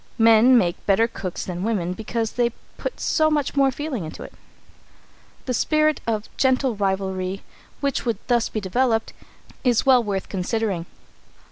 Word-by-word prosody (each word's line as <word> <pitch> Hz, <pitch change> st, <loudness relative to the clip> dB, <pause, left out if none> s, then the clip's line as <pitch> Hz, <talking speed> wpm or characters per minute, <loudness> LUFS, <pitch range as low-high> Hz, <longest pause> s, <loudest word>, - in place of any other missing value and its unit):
Men 230 Hz, +3 st, +6 dB
make 175 Hz, -6 st, 0 dB
better 210 Hz, +3 st, +4 dB
cooks 190 Hz, -6 st, -5 dB
than 180 Hz, -1 st, -5 dB
women 190 Hz, -5 st, -1 dB
because 225 Hz, +2 st, -3 dB
they 240 Hz, -1 st, 0 dB, 0.2 s
put -, -, -5 dB
so 310 Hz, -1 st, +2 dB
much 295 Hz, -3 st, -1 dB
more 275 Hz, -1 st, +4 dB
feeling 270 Hz, -, -4 dB
into 155 Hz, -, -8 dB
it. -, -, -11 dB, 1.1 s
The 255 Hz, -, -1 dB
spirit 305 Hz, +4 st, +2 dB
of 215 Hz, -2 st, -1 dB
gentle 260 Hz, -2 st, +2 dB
rivalry, 190 Hz, -1 st, -2 dB, 0.4 s
which 280 Hz, -2 st, -1 dB
would 230 Hz, -4 st, -1 dB
thus 240 Hz, -2 st, +1 dB
be 215 Hz, -, -3 dB
developed, 225 Hz, +3 st, 0 dB, 0.5 s
is 245 Hz, -4 st, +2 dB
well 255 Hz, -3 st, +5 dB
worth 195 Hz, -3 st, -3 dB
considering. 190 Hz, -2 st, -2 dB
225 Hz, 150 wpm, -23 LUFS, 195-255 Hz, 1.1 s, Men